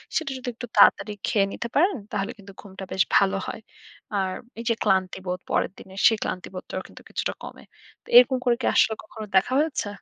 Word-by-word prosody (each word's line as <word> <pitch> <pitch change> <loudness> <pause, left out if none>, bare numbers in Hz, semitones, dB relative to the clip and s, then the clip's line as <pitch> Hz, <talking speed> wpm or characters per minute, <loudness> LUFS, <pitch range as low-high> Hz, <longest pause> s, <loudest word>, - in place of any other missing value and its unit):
সেটা 320 -4 0
যদি 255 - -9
একটু 245 0 -7
তাড়াতাড়ি 210 +1 +5
খেয়ে 200 -2 +3
নিতে 235 - -4
পারেন, 355 +3 +3
তাহলে 205 +2 -2
কিন্তু 200 0 -13
ঘুমটা 190 -1 -10
বেশ 190 - +3
ভালো 195 0 +4
হয়। - - -6 0.6
আর 190 -1 -1 0.3
এই - - -5
যে 230 - +4
ক্লান্তিবোধ, 185 -1 0
পরের - - +1
দিনে 190 0 -13
সেই 225 -2 +3
ক্লান্তিবোধটাও 185 +1 -5
কিন্তু - - -14
কিছুটা - - -2
কমে। - - -10 0.4
তো - - -26
এরকম 255 +1 +7
করে 240 -1 +4
কি - - -2
আসলে 220 - +4
কখনো 215 0 -9
দেখা 190 +7 +4
হয়েছে? 300 -8 -1
205 Hz, 190 wpm, -25 LUFS, 190-240 Hz, 0.6 s, এরকম